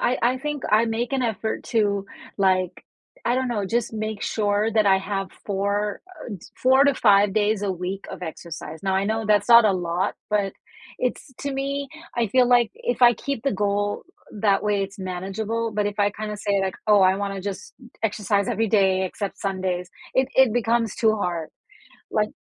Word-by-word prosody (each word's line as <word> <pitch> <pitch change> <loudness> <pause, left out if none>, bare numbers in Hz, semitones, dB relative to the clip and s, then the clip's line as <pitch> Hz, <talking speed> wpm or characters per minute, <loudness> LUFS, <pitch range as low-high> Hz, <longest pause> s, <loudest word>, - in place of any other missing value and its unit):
I 250 - +1
I 250 +2 +2
think 295 0 -4
I 220 +2 +4
make 230 +3 -2
an 270 -1 +1
effort 220 -2 -2
to, 205 -4 0 0.3
like, 185 -2 +1 0.4
I 240 - +2
don't 260 0 0
know, 210 -5 -1
just 235 +3 -1
make 215 -1 -4
sure 210 0 +1
that 215 -1 +3
I 190 -1 +5
have 195 0 -3 0.2
4, 200 +1 -1 0.3
uh, - - -9 0.2
4-5 255 -7 +5
days 210 0 +1
a 200 - 0
week 185 +2 -5
of - - -8
exercise, 160 -1 -7
now 190 -1 0
I 195 - +1
know 220 +2 -1
that's 205 0 +3
not 235 -1 +9
a 210 - +4
lot, 175 0 -1
but 205 -2 0 0.5
it's 250 +1 -3
to 280 -1 -3
me, 275 +1 -2 0.3
I 235 -2 +2
feel, 250 +4 +3
like, 240 -3 +4
if 245 0 -3
I 240 -1 +7
keep 275 +1 -4
the 275 - +1
goal 205 +1 -1 0.3
that 205 -1 +1
way, 205 -1 +1
it's 195 +1 -6
manageable, 195 +5 -3
but 210 -1 +1
if 205 0 -4
I 205 0 +3
kinda 210 +1 -5
say, 200 -1 0
like, 190 -1 -1
"Oh, 210 -1 +6
I 190 0 +5
wanna 200 -1 -3
just 195 0 -6 0.3
exercise 205 -2 0
every 225 -1 0
day 190 -3 +3
except 195 +2 -5
Sundays," 185 -2 -2 0.3
it 260 0 +2
it 265 -4 +5
becomes 230 -2 +1
too 220 -1 +2
hard. 175 -5 -2 0.6
One 210 0 0
210 Hz, 185 wpm, -24 LUFS, 195-230 Hz, 0.6 s, not